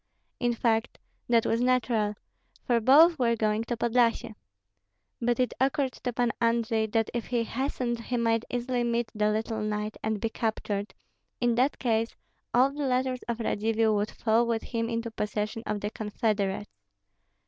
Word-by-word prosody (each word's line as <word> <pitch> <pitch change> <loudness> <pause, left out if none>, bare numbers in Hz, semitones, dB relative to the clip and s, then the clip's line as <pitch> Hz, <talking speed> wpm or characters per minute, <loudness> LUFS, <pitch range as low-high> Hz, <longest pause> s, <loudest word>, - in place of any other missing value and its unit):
In 240 -1 +1
fact, 225 0 0 0.3
that 230 -2 +4
was 230 - +1
natural, 240 -4 +1 0.5
for 240 -2 +3
both 300 +7 +6
were 235 -2 +3
going 215 0 0
to 240 0 -3
Podlyasye. 235 -1 +1 0.9
But 240 +1 +1
it 250 - +1
occurred 270 0 +1
to 245 - -4
Pan 240 0 +1
Andrei 230 -1 +1
that 225 0 0
if 235 -2 -3
he 240 -2 0
hastened 240 -1 -2
he 250 - -1
might 230 -1 +1
easily 245 0 -1
meet 235 -1 -1
the 210 0 +1
little 220 +1 -1
knight 210 0 -3
and 220 -1 -1
be 225 - -1
captured; 215 -3 -3 0.4
in 240 -1 +2
that 255 +5 +2
case, 230 -2 0 0.4
all 255 +3 +4
the 285 -1 -2
letters 255 0 0
of 235 0 -2
Radzivill 220 0 +1
would 210 0 0
fall 230 +1 +1
with 230 -1 -1
him 230 -1 -2
into 230 0 -3
possession 210 +1 -3
of 205 -1 -2
the 205 - -3
confederates. 210 -2 -2
230 Hz, 165 wpm, -28 LUFS, 220-245 Hz, 0.9 s, both